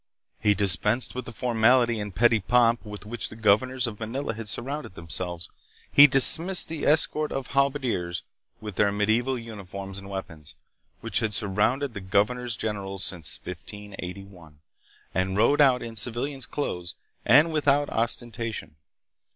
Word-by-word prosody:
He 105 -1 +3
dispensed 105 +5 +1
with 125 -1 -5
the 120 - -7
formality 120 0 +2
and 105 -3 -6
petty 115 -1 +4
pomp 115 +3 +2
with 105 -1 -9
which 120 +2 -3
the - - -11
governors 115 +4 +2
of 110 -3 -5
Manila 115 +3 -3
had 110 -1 -6
surrounded 135 -2 -5
themselves; 85 +1 -4 0.4
he 145 +1 +9
dismissed 165 +8 +4
the 160 -2 -3
escort 155 0 +2
of 135 -1 -4
halberdiers, 130 -11 0 0.4
with 105 -3 -8
their 100 - +3
mediaeval 110 +6 +1
uniforms 100 -4 -8
and 100 0 -11
weapons, 85 -6 -7 0.5
which - - +1
had 110 -3 -1
surrounded 115 +8 0
the 100 - -7
governor 105 +6 0
generals 100 -4 -3
since 85 -5 -1
1581, 90 -4 -9 0.5
and 95 +1 -1
rode 145 +7 +4
out 130 -3 +4
in 115 -1 -7
civilian's 120 +4 -3
clothes 90 -12 -4 0.3
and 150 +8 +5
without 145 -1 +2
ostentation. 115 - -3
110 Hz, 145 wpm, -26 LUFS, 100-130 Hz, 0.5 s, he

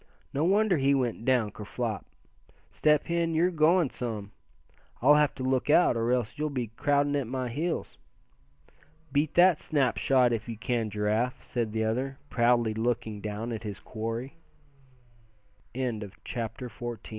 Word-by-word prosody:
No 140 - 0
wonder 200 0 +3
he 140 0 +3
went 120 -3 -1
down 125 -5 +2
ker 105 - -9
flop. 110 0 -4 0.6
Step 150 -1 +3
Hen, 170 -1 0
you're 175 +3 +3
going 165 -1 +3
some. 110 -5 -5 0.7
I'll 140 +5 +6
have 150 -1 +3
to 130 - -5
look 130 +1 0
out, 155 -4 +5
or 115 +1 0
else 125 +1 -1
you'll 155 0 0
be 125 -6 -3
crowding 145 +1 +2
at 140 -4 -1
my 130 0 -3
heels." 160 +8 -3 1.1
"Beat 145 +2 0
that 175 -2 +6
snapshot 130 -3 +2
if 115 0 -3
you 115 - -5
can, 115 0 -1
Giraffe," 105 +4 -1
said 120 -3 -2
the 110 0 -1
other, 130 +5 -1
proudly 120 -2 +3
looking 110 -2 -2
down 110 +3 -4
at 110 -2 -4
his 105 -3 -6
quarry. 115 +5 -5 1.4
CHAPTER 115 0 -4
XV. 120 -1 -6
125 Hz, 150 wpm, -28 LUFS, 115-145 Hz, 1.4 s, I'll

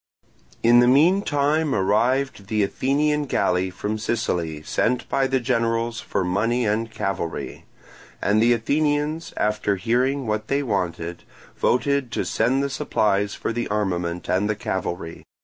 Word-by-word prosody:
In 120 +1 +6
the 120 - +5
meantime 150 0 +3
arrived 110 +3 +1
the 105 0 +1
Athenian 145 +7 0
galley 90 -7 +1
from 105 +4 -4
Sicily 85 -9 -2
sent 120 +9 0
by 135 -1 +1
the 130 0 +1
generals 115 -1 0
for 100 - -2
money 115 +7 0
and 110 +2 0
cavalry; 95 -6 -4 0.5
and 105 +2 +2
the 120 +1 +4
Athenians, 150 +6 0
after 105 -1 0
hearing 125 +7 0
what 110 0 -2
they 140 +1 0
wanted, 90 -6 -3 0.3
voted 140 0 +1
to - - -1
send 135 +3 +1
the 140 - -1
supplies 105 -4 0
for - - -3
the 120 +1 -2
armament 90 -4 -2
and 95 +4 +1
the 105 - +1
cavalry. 85 -4 -4
115 Hz, 140 wpm, -23 LUFS, 100-135 Hz, 0.5 s, In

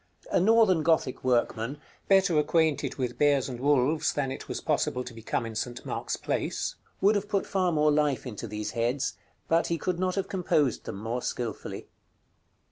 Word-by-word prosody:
A - - +3
Northern 205 -3 +5
Gothic 155 -5 +1
workman, 125 +1 0 0.3
better 190 -5 +4
acquainted 155 0 +1
with 125 -3 -3
bears 145 -3 +3
and 125 -3 -6
wolves 145 +2 +2
than 135 -2 -1
it 135 - -7
was - - -3
possible 125 - 0
to 125 - -9
become 115 +1 -3
in 115 - -6
St. 120 +3 -4
Mark's - - -3
Place, - - -2 0.3
would 200 +2 +5
have 205 0 -2
put 200 -2 0
far 185 -2 +1
more 150 -1 +3
life 145 -4 +1
into 115 -2 -6
these 105 0 -4
heads, 120 +4 0 0.3
but 165 +1 +2
he 170 - 0
could 175 +2 -2
not 185 0 0
have 195 -1 -1
composed 155 - 0
them - - -5
more 115 +5 -3
skilfully. 120 -3 -4
145 Hz, 180 wpm, -28 LUFS, 125-170 Hz, 0.3 s, Northern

